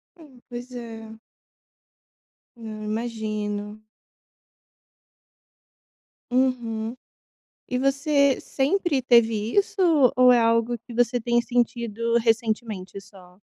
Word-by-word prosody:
Hum. 280 -7 -17
Pois 245 +1 -8
é. 225 -2 -9 1.4
Não, 215 -2 -8
imagino. 215 -2 -4 2.5
Uhum. 240 -3 -1 0.7
E 250 - -2
você 280 0 +2
sempre 290 0 0
teve 230 -3 +2
isso 405 +1 +1 0.4
ou 250 0 +6
é 240 - +5
algo 230 +1 +2
que 235 +1 -13
você 245 +1 +1
tem 240 +1 +1
sentido 235 -1 -1
recentemente 220 -4 -1
só? 185 -2 -18
235 Hz, 90 wpm, -24 LUFS, 220-250 Hz, 2.5 s, ou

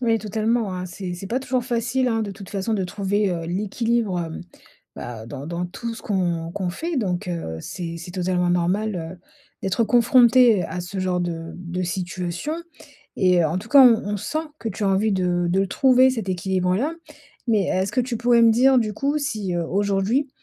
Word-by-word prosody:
Oui, 230 -2 +2
totalement, 215 0 -1
hein. 180 0 -4
C'est 180 0 -6
c'est 185 +2 -7
pas 245 +6 -1
toujours 255 -2 -1
facile, 245 +1 0
hein, 225 -1 0
de 200 - -4
toute 195 0 -10
façon 200 +2 -2
de 195 -3 0
trouver, 200 +1 0
heu, 165 -2 -3
l'équilibre, 210 +1 -1
hem, 165 +1 -5 0.5
bah, 115 -2 -7
dans 130 +4 -7
dans 170 +1 -3
tout 230 +6 -6
ce - - -11
qu'on 175 -5 -1
qu'on 185 -2 -2
fait 330 - -4
donc, 190 -4 -1
heu, 120 - -4
c'est 170 - -6
c'est 175 +1 -9
totalement 180 -1 0
normal, 185 +4 0
heu, 165 +2 -6 0.4
d'être 195 +4 +1
confronté, 240 -3 +5
heu, - - -3
à 180 - -4
ce 180 +2 -5
genre 180 -1 0
de 165 -1 -4
de 180 0 -4
situation 180 - -3 0.6
et 180 -2 +4
heu, - - +3
en 165 +4 -1
tout 220 - -9
cas, 280 - +7
on 240 -3 +8 0.2
on - - -1
sent 305 +10 -3 0.2
que 225 - -3
tu 205 +1 -4
as - - +2
envie 195 +3 +2
de 175 -2 0
de 190 - +2
le 195 - +1
trouver 260 0 +5
cet 225 -6 -4
équilibre-là. 185 - 0 0.5
Mais 210 -4 +3
est-ce 190 +2 0
que 255 - +2
tu 245 -1 -2
pourrais 240 0 +4
me 225 -1 +6
dire 260 +2 +5
du 215 -3 0
coup 285 +6 0
si, 215 -10 -3
heu, 170 -1 -1
aujourd'hui, 200 - 0
195 Hz, 210 wpm, -23 LUFS, 180-230 Hz, 0.6 s, on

